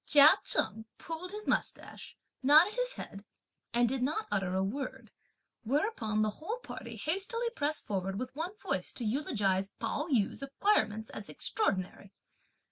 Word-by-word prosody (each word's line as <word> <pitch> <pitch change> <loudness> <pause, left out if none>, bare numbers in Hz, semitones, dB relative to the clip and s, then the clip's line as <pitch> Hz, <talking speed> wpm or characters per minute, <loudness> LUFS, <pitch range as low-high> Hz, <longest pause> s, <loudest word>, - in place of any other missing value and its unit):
Chia 295 +1 +8
Cheng 220 0 +1
pulled 335 +2 -5
his 420 +2 -6
moustache, - - -2 0.2
nodded 310 +9 +7
his - - +1
head 195 0 -8 0.5
and 240 +1 +3
did 260 +2 -1
not 305 - 0
utter 190 -2 0
a 190 - +2
word; 255 +7 -4 0.5
whereupon 230 - 0
the 215 - +1
whole 430 +9 -3
party - - -7
hastily 430 +8 0
pressed 305 -7 -1
forward 195 -1 -2
with 255 +3 -5
one 350 +7 -4
voice - - -2
to 240 - -4
eulogize 205 -6 0
Pao 300 - -2
yü's 245 - +1
acquirements 225 - +1
as 205 - -7
extraordinary. 195 - -1
270 Hz, 145 wpm, -32 LUFS, 215-345 Hz, 0.5 s, Chia